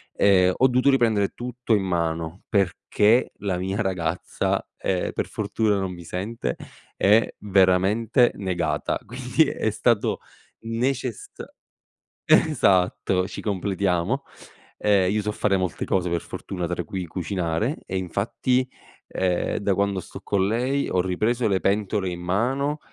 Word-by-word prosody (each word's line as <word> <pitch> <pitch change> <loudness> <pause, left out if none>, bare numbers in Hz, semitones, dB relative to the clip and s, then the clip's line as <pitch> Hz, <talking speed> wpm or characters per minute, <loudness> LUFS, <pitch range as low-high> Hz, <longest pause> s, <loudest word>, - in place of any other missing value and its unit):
ehm, 95 -2 +4
ho 130 - +5
dovuto 125 +2 +3
riprendere 110 -7 +3
tutto 125 -1 -3
in 100 - 0
mano, 85 -1 -2
perché 105 +4 +2
la 95 -3 -1
mia 95 +3 -2
ragazza, 90 -4 -1
ehm, 90 -2 -1
per - - -2
fortuna 105 -2 0
non 95 -1 -2
mi 85 -1 -10
sente, 95 - -3 0.4
è 105 +3 +4
veramente 100 +5 +3
negata, 85 -6 -1
quindi 125 +6 +1
è 110 - -1
stato 110 +1 +1 0.4
necessa 120 +1 -3 0.8
esatto, 95 - +3
ci - - -7
completiamo. 100 +4 -1 0.6
Ehm, 100 -3 +3
io 105 +1 +1
so 105 - -1
fare 105 -1 +1
molte 90 -3 -2
cose 90 -2 0
per 85 -1 -1
fortuna, 90 -3 -5
tra 90 - -2
cui 95 -2 -5
cucinare 90 - -2
e, 95 - -2
infatti, 115 +8 0 0.4
ehm, 90 -2 -1
da 100 -1 +1
quando 100 0 0
sto - - -11
con 95 -2 0
lei 125 +6 0
ho 90 - +2
ripreso 110 +7 0
le 95 -2 +1
pentole 100 -1 0
in 90 0 -6
mano 130 +11 0
100 Hz, 135 wpm, -24 LUFS, 90-115 Hz, 0.8 s, ho